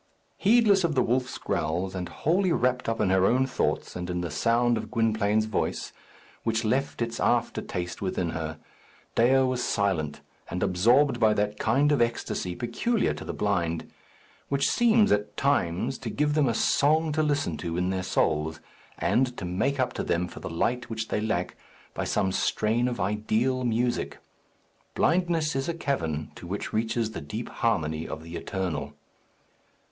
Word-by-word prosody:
Heedless 205 -3 +4
of 165 -3 +1
the 130 - +4
wolf's 125 0 0
growls, 85 +5 -2
and 90 -2 -4
wholly 180 +4 +1
wrapped 125 -5 +1
up 115 - -2
in 100 -3 +2
her 95 -1 +4
own 130 +6 +3
thoughts 130 - -1
and 90 0 -4
in 90 0 -1
the 85 - -4
sound 120 +1 +2
of 110 -1 -4
Gwynplaine's 110 -2 +1
voice, 110 - -2 0.5
which 115 0 0
left 130 +2 0
its 115 0 -4
after - - +1
taste 90 -1 -5
within 90 -3 -1
her, 80 -1 -4 0.6
Dea 130 +3 +4
was 130 -1 0
silent, 90 -8 0 0.3
and 90 - -2
absorbed 120 +8 +3
by 110 -2 +4
that 105 0 -1
kind 140 +7 +3
of 145 - +3
esctasy 115 -6 -1
peculiar 210 - 0
to - - -8
the - - -4
blind, 85 -5 -1 0.6
which 140 0 +2
seems 225 -2 +4
at 105 0 0
times 130 -3 0
to 120 - -5
give 150 +5 0
them 150 -4 +3
a 115 - 0
song 155 +6 +3
to 155 +1 +1
listen 145 - 0
to 85 +2 -4
in 90 +1 0
their 95 -1 -1
souls, 80 -3 0 0.4
and 125 -1 +1
to 95 - -4
make 105 +11 -1
up 130 - +1
to - - -3
them 85 +1 0
for - - -10
the - - -6
light 120 +9 -1
which 110 0 -4
they 105 - 0
lack 90 -5 -1 0.4
by - - -3
some 95 - +1
strain 110 +5 +1
of 125 -1 -3
ideal 110 +5 0
music. 120 +1 0 0.8
Blindness 165 -3 +2
is 135 +4 -1
a 170 - -1
cavern, 80 - -2
to 85 - -10
which 100 +3 -4
reaches 110 0 0
the 95 - -6
deep 75 - -5
harmony 80 0 -1
of 80 0 -6
the 85 +1 -8
Eternal. 80 -8 -3
110 Hz, 175 wpm, -27 LUFS, 90-130 Hz, 0.8 s, Heedless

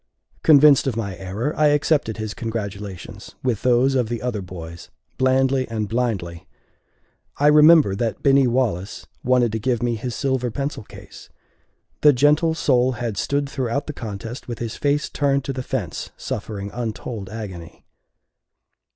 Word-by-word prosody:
Convinced 145 -3 +6
of 130 - -1
my 100 -5 -3
error, 100 - -3
I 155 - +4
accepted 145 -5 +1
his 110 -1 -4
congratulations, 100 -5 -6
with 125 -5 0
those 125 +2 +3
of 125 -4 0
the 120 -1 -2
other 120 -5 -3
boys, 85 -2 -9 0.3
blandly 130 0 +2
and 110 -2 -2
blindly. 100 -8 -2 0.9
I 145 - +1
remember 150 -7 +6
that 115 +2 -3
Binny 135 -2 +5
Wallace 115 -6 -1 0.2
wanted 125 -2 +3
to 110 - -2
give 120 +1 -1
me 120 -1 +1
his 115 +2 -4
silver 130 -3 -1
pencil 140 +3 -4
case. - - -13 0.7
The 150 -1 +7
gentle 150 +5 +3
soul 130 -4 +2
had 120 -3 -4
stood 140 +7 -1
throughout 135 0 -2
the 150 - -5
contest 115 +1 -7
with 120 -2 -5
his 115 -1 -5
face 145 0 0
turned 140 -2 0
to 135 - -3
the 130 - -4
fence, 115 -10 -4
suffering 100 -1 -5
untold 115 -3 -5
agony. 95 -7 -8
120 Hz, 150 wpm, -22 LUFS, 105-135 Hz, 0.9 s, The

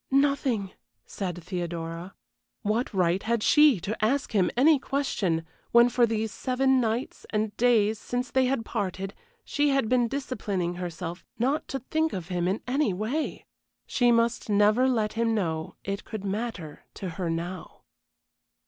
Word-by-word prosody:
"Nothing," 270 -7 +1 0.3
said 175 -3 -5
Theodora. 170 0 -5 0.5
What 220 +4 0
right 180 -1 +2
had 230 -1 0
she 295 - +6
to 210 +4 -2
ask 265 +5 +1
him 195 -5 +3
any 290 +3 +6
question, 205 -13 -1 0.3
when 235 +1 +7
for 240 -1 +3
these 220 -1 -1
seven 265 +3 +2
nights 230 +2 -2
and 215 -1 -1
days 220 -2 +3
since 245 +1 -3
they 260 0 +3
had 255 -3 0
parted 195 -3 -3 0.3
she 290 0 +1
had 275 -4 +2
been 245 0 +3
disciplining 215 -9 -2
herself 175 0 -5
not 270 +6 0
to 270 - -3
think 315 +5 -1
of 180 -2 -5
him 175 -1 0
in 195 +4 -1
any 255 -4 +1
way? 235 - -2 0.4
She 245 -1 +3
must 230 -1 +1
never 210 +5 +4
let 220 -5 +1
him 230 0 +1
know 160 -6 -2
it 200 0 -3
could 215 -3 -6
matter 195 -6 -4
to 190 - -5
her 170 +1 -3
now. 170 +1 -5
220 Hz, 155 wpm, -27 LUFS, 185-255 Hz, 0.5 s, when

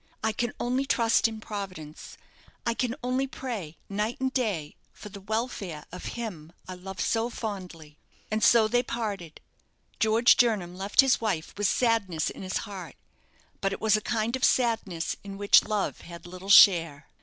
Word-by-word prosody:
I 220 - +2
can 235 +2 -2
only 255 +3 -1
trust 230 -4 +3
in 220 -1 -7
Providence 190 -8 -8 0.5
I 235 - +1
can 245 0 -2
only 255 +2 0
pray 215 - -6
night 210 +4 -2
and 265 0 -1
day 200 - -2 0.2
for 210 - -11
the 200 -1 -10
welfare 205 -7 -4
of 180 - -8
him 170 -9 -6
I 185 - -6
love 185 +1 -9
so 230 +1 0
fondly." 180 -10 -7 0.3
And 215 0 0
so 230 -2 +6
they 245 +2 +2
parted. 205 -9 -5 0.6
George 225 +2 +5
Jernam 205 -7 +1
left 195 +6 +4
his 270 -3 +2
wife 185 -8 -2
with 205 -1 +1
sadness 205 -9 +1
in - - -10
his 185 -1 -2
heart; 190 -7 -8 0.7
but 195 0 0
it - - -5
was 220 -1 +3
a 215 - 0
kind 230 +1 -1
of 260 - -5
sadness 220 -9 +1
in 200 -1 -8
which 200 0 +5
love 210 -2 -2
had 170 0 -11
little 185 +2 -9
share. 165 -8 +6
210 Hz, 170 wpm, -27 LUFS, 180-230 Hz, 0.7 s, so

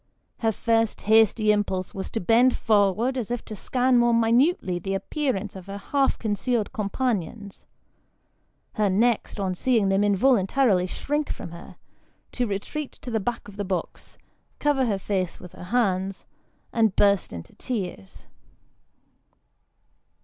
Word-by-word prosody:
Her 225 -1 +2
first 225 0 0
hasty 220 0 +4
impulse 195 -3 -1
was 190 - -5
to 225 - -3
bend 235 +6 +4
forward 220 +5 +2
as 235 - -4
if 245 -1 -3
to 215 - -7
scan 250 +4 +2
more 240 0 +3
minutely 230 - +2
the 195 +3 -3
appearance 215 -3 -2
of 190 0 -10
her 200 0 -6
half 275 +6 0
con 215 -2 -2
cealed 230 +1 -1
companions; 210 -3 -3 1.1
her 210 -2 +1
next, 220 +2 +1
on 190 -2 -1
seeing 220 0 +1
them 195 +1 +2
involuntarily 205 -1 +3
shrink 295 +9 -2
from 170 - -6
her, 170 0 -11 0.6
to 245 -1 -1
retreat 220 +9 -4
to 245 - -9
the 220 - +1
back 235 +2 -4
of 205 0 -12
the 205 - -2
box, 185 -2 -5 0.4
cover 280 -3 +1
her 205 -3 0
face 190 -2 -2
with 180 - -12
her - - -10
hands, 195 -3 0 0.5
and 220 -4 +2
burst 200 -2 +3
into 85 -2 -9
tears. 185 - -6
215 Hz, 145 wpm, -25 LUFS, 195-245 Hz, 1.1 s, hasty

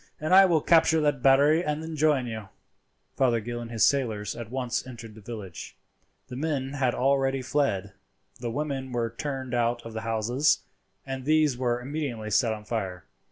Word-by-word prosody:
I 185 +5 +6
will 165 -4 +3
capture 160 0 +4
that 145 -3 +1
battery 145 +5 +5
and 150 0 -2
then 160 0 -5
join 150 -4 +2
you." 110 -4 -6 0.7
Fothergill 120 -2 +1
and 115 - -7
his 115 -2 +3
sailors 110 -7 0
at 115 -2 -7
once 125 0 -2
entered 115 -3 -9
the 110 - -13
village. 105 -5 -8 0.5
The 125 - -8
men 140 -2 -2
had 130 -4 0
already 135 0 +1
fled; 100 -9 0 0.5
the 120 -1 -3
women 135 0 -3
were 115 -2 -1
turned 135 -2 -4
out 120 0 0
of 115 - -8
the 110 - -4
houses, 115 +5 +1 0.4
and 135 -1 -5
these 155 -1 +3
were 120 -1 0
immediately 125 -6 -4
set 115 +3 +3
on 105 -1 -6
fire. 95 -6 -4
130 Hz, 170 wpm, -27 LUFS, 115-145 Hz, 0.7 s, I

